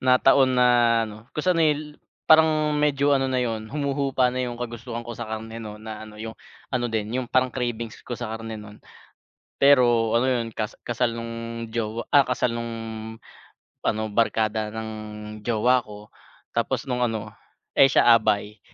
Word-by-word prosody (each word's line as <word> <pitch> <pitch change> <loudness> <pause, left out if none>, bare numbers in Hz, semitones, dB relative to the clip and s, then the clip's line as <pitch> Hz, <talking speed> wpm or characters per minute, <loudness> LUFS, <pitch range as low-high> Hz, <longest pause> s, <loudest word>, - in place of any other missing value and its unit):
na 130 0 +5
taon 135 -1 +4
na 125 0 +5 0.4
ano 110 +1 -10
kung 150 - -2
sa 185 - +4
nil 150 -3 0 0.3
parang 155 -1 +5
medyo 145 -1 +2
ano 135 - 0
na 130 -1 0
'yun 110 -2 -3
humuhupa 140 -3 0
na 130 - -2
yung 120 - -4
kagustuhan 120 0 -6
ko 120 - -6
sa 120 - -5
karne 110 +1 -6
no 105 -1 -7
na 110 0 -8
ano 105 - -13
yung 110 +1 -6 0.4
ano 120 -1 0
din 110 -1 -2
yung 130 - -3
parang 130 0 +2
cravings 115 -3 -3
ko 120 - -3
sa 120 -3 -5
karne 115 0 -6
nu'n. 105 0 -11 0.8
Pero 120 -5 +4
ano 120 +3 +3
yun 115 -3 -1
kas 110 +1 -4
kasal 120 -1 0
nung 115 0 -5
jowa, 115 0 -2
ah, 145 - +8
kasal 125 -1 0
nung 115 0 -4 1.1
ano 110 - +1
barkada 110 -1 +1
ng 110 0 -5 0.5
jowa 120 +3 +3
ko 105 0 -12 0.5
tapos - - 0
nung 125 -1 -1
ano, 110 -2 -4 0.5
eh, 135 - +8
siya 120 - +6
abay 105 -2 0
115 Hz, 170 wpm, -24 LUFS, 110-130 Hz, 1.1 s, ah